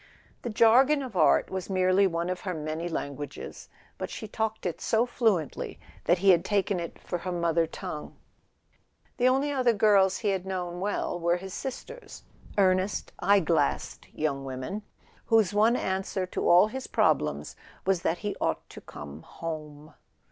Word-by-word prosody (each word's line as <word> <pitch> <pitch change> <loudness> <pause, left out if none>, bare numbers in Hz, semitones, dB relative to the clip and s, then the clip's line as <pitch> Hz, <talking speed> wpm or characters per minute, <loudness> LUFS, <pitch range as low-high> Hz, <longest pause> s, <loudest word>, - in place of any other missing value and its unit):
The 240 - -4
jargon 255 +6 +5
of 250 -6 -8
art 155 -5 +4
was 190 0 -4
merely 185 +1 +3
one 170 0 -2
of 185 - -3
her 185 -3 -3
many 155 +2 -3
languages; 145 -2 -6 0.3
but - - -3
she 220 - -6
talked 220 0 -3
it 175 - -3
so 225 +2 +2
flu¬ 220 -9 +2
ently - - -7 0.3
that 175 - +4
he 195 +2 +5
had 170 -2 +4
taken 200 -2 0
it 170 -1 -6
for 175 - -4
her 180 +2 -4
mother 170 -1 +1
tongue. 165 -2 -7 1.0
The 250 - +3
only 270 +3 +2
other 255 -4 +3
girls 200 -3 +4
he 210 - -1
had 190 -2 0
known 180 -2 -4
well 195 -2 -2
were 170 +1 +2
his 190 +1 -8
sisters—earnest 205 - -2
eye 200 +2 +4
glassed 155 - 0
young 140 -3 -2
women, 135 +10 -5 0.5
whose 220 -3 +3
one 220 +3 +4
answer 190 -2 -1
to 185 - -1
all 175 +3 +7
his 260 +5 -6
problems - - +1 0.3
was 190 -2 +2
that 170 - 0
he 205 - -1
ought - - -1
to - - -10
come 75 +1 -10
home. 155 - -7
185 Hz, 165 wpm, -28 LUFS, 170-210 Hz, 1.0 s, all